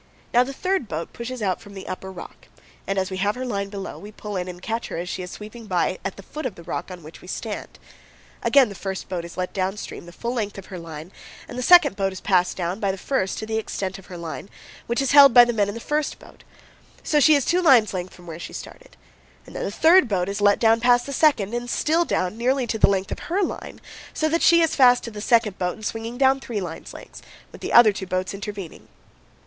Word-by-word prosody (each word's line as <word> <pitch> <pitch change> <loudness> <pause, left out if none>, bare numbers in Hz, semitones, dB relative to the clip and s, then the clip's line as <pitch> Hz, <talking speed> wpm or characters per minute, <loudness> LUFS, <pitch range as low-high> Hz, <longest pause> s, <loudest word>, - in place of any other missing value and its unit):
Now 245 +1 +6
the 265 - -6
third 365 - -1
boat 160 -1 -5
pushes 235 0 -6
out 185 -3 -1
from 205 -2 -13
the 195 - -8
upper 190 +1 -6
rock, 180 - -11 0.4
and, 195 - -1
as 190 0 -1
we 190 - -3
have 205 +2 0
her 255 +1 -4
line 200 -5 -3
below, 195 -1 -7
we 205 +2 -10
pull 210 -1 -7
in 180 -1 -2
and 180 -1 -8
catch 225 +5 -3
her - - -5
as 175 +2 -4
she 185 - -4
is 180 - -6
sweeping 215 +3 -10
by 185 -1 0
at 195 - -4
the 195 - -10
foot 300 +6 -5
of 215 - -8
the 170 - -12
rock 175 - -5
on 180 -2 -9
which 155 +2 -12
we - - -14
stand. 210 +3 -6 0.6
Again 275 -5 +5
the - - -7
first 190 -1 -5
boat 180 -3 -4
is 170 - -10
let 185 0 -3
down 190 +1 -1
stream 175 - -8
the - - -10
full 235 +7 -4
length 210 -5 -3
of 195 - -8
her 185 -3 -8
line 165 +1 -9 0.4
and - - -9
the 250 - -3
second 320 - +6
boat 195 -1 0
is 190 - -8
passed 180 -2 +1
down, 180 +2 -2
by 200 - 0
the 190 - -6
first 190 -3 -1
to 220 - -4
the 220 0 -1
extent 195 -3 -4
of 190 - -16
her 180 - -8
line, 170 +3 -7 0.4
which 235 +3 0
is 270 - 0
held 280 -3 +8
by 245 0 +10
the 240 - -1
men 205 -3 +1
in 205 - -5
the - - -5
first 300 +4 -2
boat; - - -17 0.6
so 300 - +2
she 305 +1 +6
is 280 -3 +1
two 360 +2 +2
lines' 250 - +5
length 185 0 -5
from 175 - -15
where 165 -1 -8
she - - -8
started. - - -10 0.5
Then - - -14
the - - -2
third 325 - +5
boat 190 -3 0
is 200 +1 -3
let 205 0 +5
down 225 0 +4
past 245 +1 +4
the 280 - -5
second, 250 -10 +2
and 240 0 -3
still 325 +7 +1
down, 185 - -1
nearly 255 +2 +1
to 220 -1 -3
the - - +6
length 195 -1 -1
of - - -4
her 390 +4 +1
line, - - -5 0.4
so 310 - +1
that 335 +2 +1
she 335 0 +6
is 325 - +2
fast 250 -2 +5
to 230 - -6
the 210 -1 -7
second 225 -3 +2
boat 180 -1 -1
and 215 - -10
swinging 225 +2 -4
down 270 0 +4
three 235 -5 -4
lines' 175 -4 -7
lengths, - - -12 0.3
with - - -13
the - - -4
other 230 -3 +7
two 190 -1 -6
boats 185 +1 -2
intervening. 200 -3 -7
210 Hz, 265 wpm, -23 LUFS, 185-245 Hz, 0.6 s, by